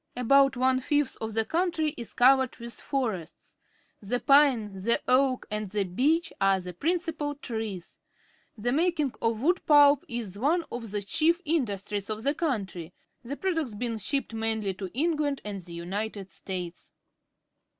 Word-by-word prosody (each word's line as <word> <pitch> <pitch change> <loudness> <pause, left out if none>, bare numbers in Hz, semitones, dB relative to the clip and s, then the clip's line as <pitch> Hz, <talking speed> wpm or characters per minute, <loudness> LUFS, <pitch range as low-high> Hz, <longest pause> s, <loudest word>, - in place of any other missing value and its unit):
About 275 +2 +4
one 255 +1 +3
fifth 290 +1 0
of 220 -1 -4
the 225 -1 +2
country 325 -2 0
is 235 - -8
covered 260 0 +4
with 235 -1 -8
forests. 220 - -4 0.5
The 230 +4 -1
pine, 275 -8 +4
the 235 +4 +2
oak, 255 0 +3
and 210 -1 -3
the 205 +1 0
beech 275 - +1
are 195 0 +4
the 180 -1 -7
principal 320 - -1
trees. 220 - -6 0.6
The 235 +3 -1
making 310 -2 +1
of 230 +1 0
wood 355 +4 +2
pulp 290 -2 +6
is 220 -5 -5
one 325 +7 +1
of 235 -2 -5
the 205 0 -2
chigf 320 +10 +2
_ - - -26
industrie 210 - -1
s 200 - -12
of 215 0 -4
the 280 +2 +2
countrj% 200 - -3 0.3
the 275 +4 -5
products 325 - -1
being 230 0 -2
shipped 275 +3 -2
mainly 220 -3 -1
to 190 0 -6
England 295 -2 0
and 200 -2 -5
the 170 -1 -9
L^nited 195 +2 -4
States. 180 -3 -6
240 Hz, 160 wpm, -28 LUFS, 205-290 Hz, 0.6 s, pulp